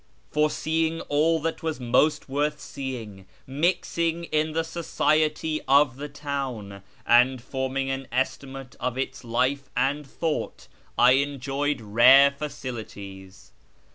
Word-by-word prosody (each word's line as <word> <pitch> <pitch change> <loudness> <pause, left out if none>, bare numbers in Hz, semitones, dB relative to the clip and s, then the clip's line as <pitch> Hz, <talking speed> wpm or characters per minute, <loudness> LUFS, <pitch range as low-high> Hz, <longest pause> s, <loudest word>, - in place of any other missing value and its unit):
For 150 0 +2
seeing 160 +1 -1
all 160 +3 +2
that 165 +2 -3
was 160 -3 -3
most 130 +5 +2
worth 145 +2 -1
seeing, 115 -11 -7 0.2
mixing 170 +3 0
in 155 -1 -1
the 165 +1 0
society 155 -1 0
of 140 -2 +4
the 145 +1 -6
town, 135 -9 -5 0.2
and 125 +2 +5
forming 135 +2 -3
an 135 -1 -4
estimate 130 +1 -3
of 125 0 -2
its 135 0 -4
life 130 +4 -1
and 140 +4 +1
thought, 155 +3 -3 0.3
I 125 +1 +6
enjoyed 140 0 0
rare 120 +6 +7
facilities. 110 -9 -8
140 Hz, 120 wpm, -25 LUFS, 125-150 Hz, 0.3 s, rare